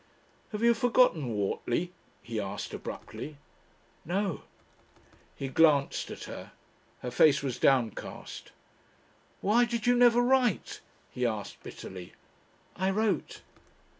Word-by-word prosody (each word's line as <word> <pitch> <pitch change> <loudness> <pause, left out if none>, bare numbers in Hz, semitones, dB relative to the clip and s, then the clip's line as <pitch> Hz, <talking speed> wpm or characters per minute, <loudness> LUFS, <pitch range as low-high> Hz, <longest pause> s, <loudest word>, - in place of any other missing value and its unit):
"Have 210 +1 -3
you 235 0 +6
forgotten 230 - +3
Whortley?" 120 - -1 0.3
he 115 -2 -4
asked 100 0 -5
abruptly. 150 -1 -7 0.7
"No." 190 +1 -1 0.9
He 135 - -4
glanced 145 0 +3
at - - -7
her; - - -8 0.5
her 125 - -3
face 140 +2 +5
was 130 -3 -3
downcast. 125 -6 0 0.9
"Why 225 +5 +4
did 235 -2 -2
you 245 0 +5
never 240 -1 +6
write?" 250 -4 +1 0.3
he 125 - -4
asked 110 -4 -2
bitterly. 90 -2 -9 0.6
"I 190 +1 0
wrote." 205 -3 -1
165 Hz, 110 wpm, -29 LUFS, -, 0.9 s, you